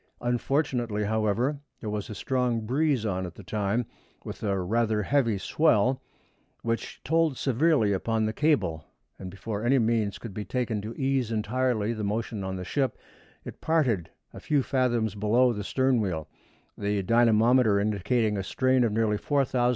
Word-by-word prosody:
Unfortunately, 120 -3 0
however, 110 +6 0 0.2
there 110 - -5
was 105 -1 -4
a 105 - -6
strong 125 0 0
breeze 130 +1 0
on 95 -3 -2
at 85 - -11
the 100 - -11
time, 105 +4 -1 0.4
with - - -7
rather 105 +2 0
a - - -4
heavy 120 -6 +2
swell, 130 - +2 0.6
which 115 0 -3
told 160 -2 +1
severely 135 -5 +2
upon 110 +3 0
the 110 - -1
cable, 135 - +1 0.4
and 95 - -6
before 100 +3 -5
any 130 +3 +3
means 110 -3 +1
could 115 -4 -8
be 105 - -4
taken 120 -3 -2
to 110 +3 -7
ease 135 -4 0
entirely 115 0 0
the 110 -2 -5
motion 105 0 -2
on 95 0 -3
the 90 0 -5
ship, 135 +2 -1 0.5
it - - -9
parted 130 - +1 0.2
a - - -9
few 145 -3 +1
fathoms 120 -6 0
below 115 +4 +3
the 105 -2 -4
stern 130 +2 +1
wheel, 80 -7 -3 0.5
the 100 -1 -1
dynamometer 115 0 +4
indicating 105 +2 0
a - - -2
strain 130 +4 +2
of 115 - +1
nearly 105 -1 +1
4,000 135 0 0
lbs. 120 0 +3
115 Hz, 165 wpm, -27 LUFS, 105-130 Hz, 0.6 s, dynamometer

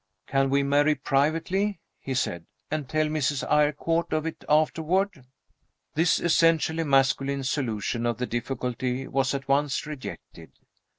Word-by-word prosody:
"Can 135 0 +1
we 140 +1 +2
marry 145 +2 +3
privately," 160 +9 0 0.2
he 135 - -4
said, 85 -9 -2 0.2
"and 150 -4 -3
tell 155 0 +1
Mrs. 150 -2 -1
Eyrecourt 150 +3 +1
of 155 0 0
it 165 - -5
afterward?" 160 +2 +1 0.7
This 165 +3 +3
essentially 165 -1 +2
masculine 135 -1 +2
solution 120 -3 -1
of 120 -2 -1
the 125 - -2
difficulty 125 +1 -3
was 135 0 0
at 135 -1 -5
once 140 0 +1
rejected. 130 - -9
140 Hz, 130 wpm, -26 LUFS, 130-155 Hz, 0.7 s, marry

